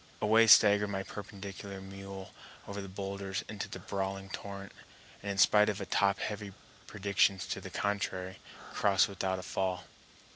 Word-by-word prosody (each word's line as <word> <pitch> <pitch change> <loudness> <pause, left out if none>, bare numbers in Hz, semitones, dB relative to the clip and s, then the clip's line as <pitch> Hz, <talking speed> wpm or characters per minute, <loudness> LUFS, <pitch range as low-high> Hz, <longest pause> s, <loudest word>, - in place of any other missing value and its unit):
Away 110 +2 +5
staggered 105 -1 +7
my 95 -1 -3
perpendicular 100 -1 -8
mule 95 0 -9 0.4
over 100 0 -5
the 100 - -8
boulders 100 +1 -4
into 105 -2 -5
the - - -6
brawling 95 0 -4
torrent, 100 -1 -7 0.5
and 100 - -5
in - - -8
spite 105 +2 +6
of 100 -1 -3
top 100 -1 +3
heavy 105 -2 -4 0.3
predictions 100 -2 +1
to - - -4
the - - -7
contrary, 95 -2 -2 0.3
crossed 100 -2 +4
without 95 -1 -2
a 90 - -6
fall. 90 0 -2
100 Hz, 150 wpm, -32 LUFS, 95-100 Hz, 0.5 s, staggered